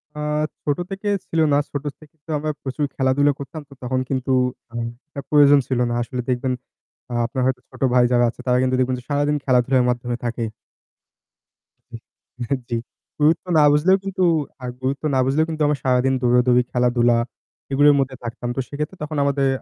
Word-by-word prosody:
আ - - -6 0.4
ছোট 145 -1 0
থেকে 195 +2 -5 0.2
ছিল 165 - -1
না। - - +5
ছোট 145 -1 -4 0.2
থেকে 155 0 -18
তো - - -22
আমরা 155 +1 -2
প্রচুর 140 +2 -2
খেলাধুলা 140 +2 +3
করতাম। 145 +3 -7
তো 140 - -13
তখন 130 +1 -1
কিন্তু 130 -1 -1 0.4
আম 115 0 -3 0.2
একটা 145 -2 -7
প্রয়োজন 145 -1 +6
ছিল 130 -2 0
না। - - -1
আসলে 125 +1 -3
দেখবেন 125 +1 0 0.6
আ - - -4
আপনার 130 +2 -3
হয়তো 130 -1 0
ছোট - - -16
ভাই 125 -1 +5
যারা 120 -1 +4
আছে - - -11
তারা 125 0 +3
কিন্তু 130 0 +1
দেখবেন 130 0 +1
যে 125 - -14
সারাদিন 145 +1 +1
খেলাধুলার 130 0 +3
মাধ্যমে 120 0 -2
থাকে। 120 0 -2 2.0
এহ 120 +2 -5 0.2
জ্বী। 120 - 0 0.4
গুরুত্ব 155 +4 +3
না 150 - +6
বুঝলেও 180 +6 +4
কিন্তু 190 -1 -2 0.4
আ - - -3 0.2
গুরুত্ব 135 +3 -2
না 130 - +2
বুঝলেও 145 +4 +2
কিন্তু 155 -1 -4
আমরা 150 0 +1
সারাদিন 130 0 +2
দৌড়াদৌড়ি 125 0 +4
খেলাধুলা 120 -1 +3 0.5
এগুলোর 145 +1 +5
মধ্যে 135 -1 -1
থাকতাম। 120 +1 -5
তো - - -3
সেক্ষেত্রে 150 +6 -5
তখন 150 0 -4
আমাদের 140 -1 +1
130 Hz, 180 wpm, -21 LUFS, 125-145 Hz, 2.0 s, প্রয়োজন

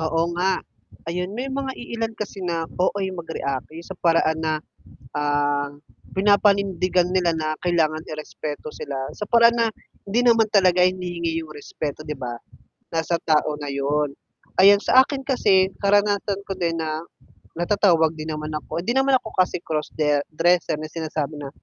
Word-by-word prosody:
Oo 165 +1 0
nga. 185 +1 +2 0.5
Ayun, 180 +3 -3
may 255 +3 -3
mga 270 0 -2
iilan 230 -2 -4
kasi 205 -2 -6
na 170 -2 -1
OA 190 +2 +1
mag-react, 160 -7 -4
yung 170 +1 -8
sa 190 - -8
paraan 165 -2 +2
na, 160 -1 0 0.6
ah, 145 -1 +1 0.4
pinapanindigan 195 -3 +3
nila 180 -2 +2
na, 155 -1 -1
kailangan 160 -3 +1
i-respeto 155 -1 -6
sila, 140 -2 -6 0.2
sa - - -3
paraan 235 +1 +5
na, 230 -1 +3 0.4
hindi 210 +4 +1
naman 230 -2 +5
talaga 185 -3 +4
hinihingi 175 -3 -2
yung 160 - -11
respeto, 150 0 -6
'di 150 - -3
ba, 120 -2 -4 0.5
nasa 165 +1 0
tao 155 -1 +2
na 145 - -4
'yon. 140 +1 0 0.5
Ayan, 200 +1 +7
sa 260 +4 +6
akin 275 -1 -4
kasi, 195 -8 +3
karanasan 200 0 +2
ko 195 - -2
din 170 -2 -1
na, 155 0 -2 0.6
natatawag 175 -3 +3
din 155 +1 -5
naman 155 0 -5
ako, 165 - -5
hindi 230 +7 -1
naman 270 0 +4
ako - - -8
kasi 185 -2 +2
cross-de 150 -1 0
dresser, 170 0 +2
na 155 - -6
sinasabi 155 -2 -4
na, 145 -2 -6
170 Hz, 160 wpm, -23 LUFS, 155-200 Hz, 0.6 s, Ayan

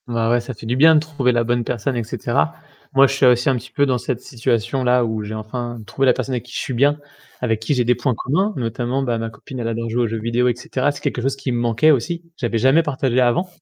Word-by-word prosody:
Ouais, 115 -2 0
ouais, 120 +1 +3
ça 120 +2 -7
fait 105 - -11
du 120 +3 -1
bien 160 +4 +6
de - - +6
trouver 145 -5 0
la 120 -1 +1
bonne 120 +1 0
personne 125 +2 -2
et 120 - -1
cetera. 110 -10 -1 0.4
Moi 135 +1 +7
je - - -2
suis 135 -1 +2
aussi 125 +1 +4
un 135 - +2
petit 120 - -7
peu 145 -2 +2
dans 130 -3 0
cette 125 0 -3
situation-là 125 +1 0
où 110 -1 -3
j'ai 105 +1 -6
enfin 120 +2 -5
trouvé 135 +4 -1
la - - +7
personne 130 0 -3
avec 120 - -2
qui 125 - -14
je - - -2
suis 130 - -4
bien, 145 +4 +2 0.4
avec 115 -3 0
qui 115 - 0
j'ai 125 -2 +1
des 125 +1 +3
points 130 -2 -1
communs 185 - 0
notamment, 120 +2 -2
bah, 120 -3 -1
ma 115 0 -3
copine 120 +4 -10
elle 115 - -2
adore 115 0 -3
jouer 120 +2 0
aux - - +1
jeux 110 +1 -3
vidéo 115 +3 +1
et 120 - +1
cetera. 130 +3 -1
C'est 145 - -10
quelque 120 - -2
chose 135 +2 0
qui 135 -1 -4
me 120 - -1
manquait 120 +6 +3
aussi, 165 +6 -1
j'avais 120 -7 -2
jamais 130 +8 +4
partagé 130 -4 0
avant. 125 +10 +2
125 Hz, 280 wpm, -20 LUFS, 115-135 Hz, 0.4 s, Moi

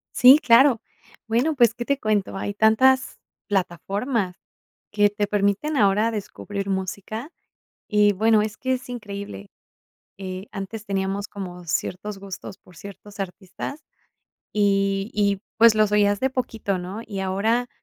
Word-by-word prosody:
Sí, 255 +4 +8
claro. 250 -2 +5 0.5
Bueno, 240 +8 +1
pues, 240 -5 +4
¿qué 240 0 -5
te 280 +1 0
cuento?, 210 -3 0
hay 205 +1 -3
tantas 260 +5 +3 0.3
plataformas 195 +2 -1 0.5
que 205 -1 +3
te 205 0 -1
permiten 205 +9 0
ahora 210 +1 +3
descubrir 205 -2 -5
música 200 - -4 0.6
y, 210 -1 +4
bueno, 215 +2 +3
es 210 -1 -4
que 260 0 -1
es 255 0 -7
increíble. 200 - -7 0.7
Eh, 185 0 -6
antes 210 +2 -6
teníamos 195 0 -2
como 180 -3 -8
ciertos 195 +5 -3
gustos 195 -1 -8
por 180 - -20
ciertos 200 +1 -11
artistas 195 - -6 0.7
y 195 0 +1
y, 200 -2 +1 0.2
pues, 230 -1 +7
los 215 -1 +2
oías 205 -1 +3
de 265 - +1
poquito, 225 -6 -2
¿no?, 185 +4 -6
y 200 -3 -5
ahora, 215 +6 0
205 Hz, 140 wpm, -23 LUFS, 195-225 Hz, 0.7 s, Sí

